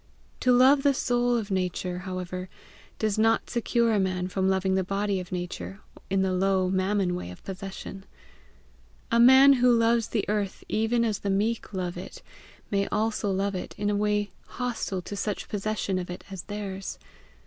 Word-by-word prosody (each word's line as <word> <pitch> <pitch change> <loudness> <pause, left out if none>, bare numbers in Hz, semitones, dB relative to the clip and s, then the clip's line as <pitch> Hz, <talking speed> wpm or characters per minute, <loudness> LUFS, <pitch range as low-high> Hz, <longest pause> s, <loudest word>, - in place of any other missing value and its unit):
To 255 - +3
love 260 +3 +6
the 280 -1 +3
soul 245 -1 +1
of 215 -3 -4
Nature, 180 -1 -1
however, 185 0 -5 0.5
does 215 -1 0
not 225 +1 +2
secure 235 0 +1
a 210 - +3
man 185 -1 -1
from 190 +1 0
loving 190 0 +1
the 190 0 +2
body 195 +1 -1
of 180 - -8
Nature 180 +2 -5 0.3
in 195 0 +2
the 190 -1 0
low 185 0 +2
Mammon 190 -1 +1
way 175 - -4
of 90 - -11
possession. 195 0 -7 1.1
A 235 - +4
man 265 +3 +8
who 250 -1 +4
loves 230 -1 +3
the 215 - -1
earth 205 -2 -2
even 230 +2 +1
as 215 -3 -1
the 200 - -3
meek 210 +4 0
love 180 -3 -3
it, 180 - -9 0.5
may 200 -1 +1
also 215 -1 0
love 195 +1 0
it 185 - -5
in 205 0 0
a - - 0
way 210 0 0 0.2
hostile 235 -7 -3
to 205 - -6
such 200 0 -3
possession 205 -2 -2
of 180 - -6
it 180 - -7
as 190 - -6
is - - -5
theirs. 200 -2 -5
200 Hz, 180 wpm, -27 LUFS, 185-225 Hz, 1.1 s, man